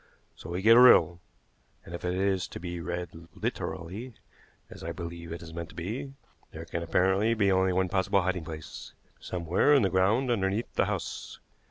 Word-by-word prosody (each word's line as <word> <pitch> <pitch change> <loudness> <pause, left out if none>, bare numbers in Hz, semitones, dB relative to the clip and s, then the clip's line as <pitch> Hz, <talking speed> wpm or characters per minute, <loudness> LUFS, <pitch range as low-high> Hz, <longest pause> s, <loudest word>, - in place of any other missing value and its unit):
So - - -11
we 90 +2 -3
get 115 +2 +7
a - - +9
riddle, 85 -9 +7 0.7
and 85 - -10
if 85 - -6
it 90 0 -1
is 95 -1 0
to - - -8
be 85 0 -5
read 85 -1 -6
literally, 105 +9 -5 0.5
as - - -12
I - - -4
believe 85 -1 -7
it 85 0 -6
is 80 0 -10
meant 85 0 -6
to - - -15
be, 120 +11 -5 0.4
there 80 +1 -9
can 85 - -4
apparently 95 +6 +2
be 100 -3 +2
only 95 0 +3
one 95 +1 +1
possible 95 +1 +1
hiding 90 -2 -1
place 80 -1 -9 0.3
somewhere 90 - +2
in 135 - +4
the 95 - +1
ground 110 +8 +2
underneath 100 0 -1
the - - +2
house. - - -5
95 Hz, 190 wpm, -28 LUFS, 85-100 Hz, 0.7 s, a